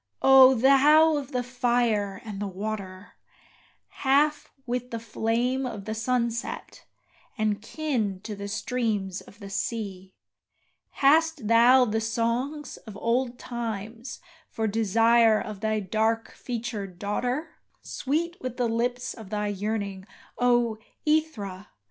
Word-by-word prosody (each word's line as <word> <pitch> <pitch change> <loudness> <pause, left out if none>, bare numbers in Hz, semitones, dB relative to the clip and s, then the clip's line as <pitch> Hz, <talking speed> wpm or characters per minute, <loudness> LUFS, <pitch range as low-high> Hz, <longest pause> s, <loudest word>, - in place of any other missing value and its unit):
Oh, 265 -1 +8
thou 290 +5 +6
of 285 -3 -4
the 250 -1 -1
fire 240 -4 0
and 210 -3 -6
the 205 - -2
water, 195 -1 -6 0.9
Half 290 +3 +2
with 250 0 -3
the 230 - -4
flame 230 +3 -1
of 205 -5 -7
the 220 - -3
sunset, 235 +1 -2 0.5
and 215 -1 0
kin 225 -7 -2
to 215 0 -6
the 200 0 -6
streams 210 -4 -2
of 200 - -16
the 200 -2 -9
sea, 195 -3 -4 0.9
Hast 320 -3 +4
thou 240 +3 +6
the 220 -1 -1
songs 235 +7 -2
of 215 -3 -11
old 240 +3 0
times 230 0 -6 0.3
for 225 - -2
desire 225 +1 +4
of 210 -3 -6
thy 215 0 0
dark 220 +3 0
featured 220 -6 -5
daughter, 245 - -3 0.3
Sweet 330 +5 -2
with 255 -1 -5
the 245 -2 +1
lips 245 +2 -1
of 220 -4 -11
thy 210 0 -1
yearning, 200 -1 -3 0.3
O 240 -3 +2 0.3
Aethra! 220 -12 -1
230 Hz, 125 wpm, -26 LUFS, 210-250 Hz, 0.9 s, Oh